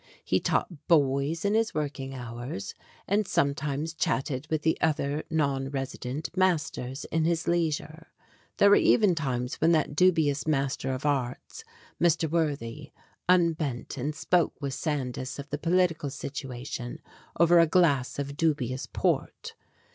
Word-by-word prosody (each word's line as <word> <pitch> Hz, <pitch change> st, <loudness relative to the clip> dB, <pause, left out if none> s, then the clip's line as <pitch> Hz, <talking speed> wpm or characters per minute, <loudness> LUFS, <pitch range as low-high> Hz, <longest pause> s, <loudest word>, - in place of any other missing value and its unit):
He -, -, +2 dB
taught 165 Hz, -6 st, -2 dB
boys 145 Hz, +2 st, +2 dB
in 200 Hz, -, +2 dB
his 225 Hz, 0 st, +1 dB
working 140 Hz, -3 st, -3 dB
hours, 120 Hz, -3 st, -6 dB, 0.3 s
and 205 Hz, 0 st, +1 dB
sometimes 145 Hz, +2 st, 0 dB
chatted 145 Hz, -4 st, -1 dB
with 155 Hz, -2 st, -1 dB
the 160 Hz, -, +3 dB
other, 150 Hz, -1 st, 0 dB
non 140 Hz, -4 st, 0 dB
resident, 135 Hz, +3 st, -5 dB
masters 150 Hz, -7 st, 0 dB
in 160 Hz, -1 st, +1 dB
his 170 Hz, 0 st, 0 dB
leisure. 165 Hz, -1 st, -1 dB, 0.5 s
There 200 Hz, -, +6 dB
were -, -, +8 dB
even 210 Hz, -5 st, +4 dB
times 130 Hz, -5 st, -3 dB
when 165 Hz, +2 st, +5 dB
that 155 Hz, -2 st, +1 dB
dubious 160 Hz, -5 st, +3 dB
Master 135 Hz, -3 st, 0 dB
of 130 Hz, +2 st, -4 dB
Arts, 135 Hz, -4 st, -2 dB, 0.4 s
Mr. 170 Hz, -1 st, +3 dB
Worthy, 150 Hz, -4 st, -2 dB, 0.4 s
unbent 160 Hz, -9 st, +1 dB
and 145 Hz, +3 st, -3 dB
spoke 175 Hz, +2 st, +1 dB
with 140 Hz, -2 st, -3 dB
Sandys 130 Hz, -4 st, -3 dB
of 140 Hz, 0 st, -8 dB
the 145 Hz, -, -2 dB
political 165 Hz, -2 st, +1 dB
situation 135 Hz, -1 st, -6 dB, 0.4 s
over 170 Hz, 0 st, +6 dB
a 165 Hz, -, +6 dB
glass 150 Hz, -7 st, +2 dB
of 140 Hz, 0 st, -4 dB
dubious 140 Hz, -6 st, 0 dB
port. -, -, -1 dB
150 Hz, 140 wpm, -28 LUFS, 135-165 Hz, 0.5 s, were